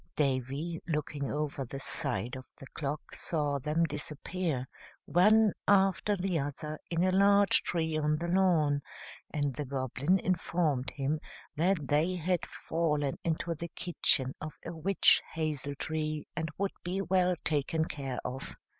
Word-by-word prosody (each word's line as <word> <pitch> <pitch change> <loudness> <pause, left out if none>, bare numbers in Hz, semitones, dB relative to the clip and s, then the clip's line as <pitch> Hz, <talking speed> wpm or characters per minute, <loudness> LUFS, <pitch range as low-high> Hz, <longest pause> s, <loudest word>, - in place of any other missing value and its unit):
Davy, 140 +4 -1
looking 150 -3 -2
over 150 -2 -2
the 135 +2 -6
side 120 -2 -2
of 130 0 -9
the - - -10
clock, 145 0 -4
saw 145 -4 -1
them 150 +5 +1
disappear, 150 -2 -2 0.4
one 210 +6 +5
after 195 +1 +4
the 180 -3 0
other, 150 +2 -4
in 170 0 +1
a 185 - +3
large 200 +1 +5
tree 160 -2 -1
on 150 0 +1
the 170 +2 -3
lawn, 170 -6 +3 0.5
and 145 -3 0
the 150 - -3
Goblin 135 +5 0
informed 170 -7 0
him 145 +2 -1 0.4
that 165 -2 +1
they 155 +6 +2
had 180 0 0
fallen 150 -4 -1
into 165 +1 -1
the 170 +2 -6
kitchen 135 -6 +2
of 155 -1 -6
a 170 - -5
witch 175 +4 +4
hazel 150 -3 -2
tree, 155 +1 -2
and 160 -1 -2
would 200 0 -1
be 180 +2 -2
well 180 -1 +3
taken 160 +1 +1
care 135 -5 -4
of. 130 +1 -5
155 Hz, 145 wpm, -31 LUFS, 145-175 Hz, 0.5 s, one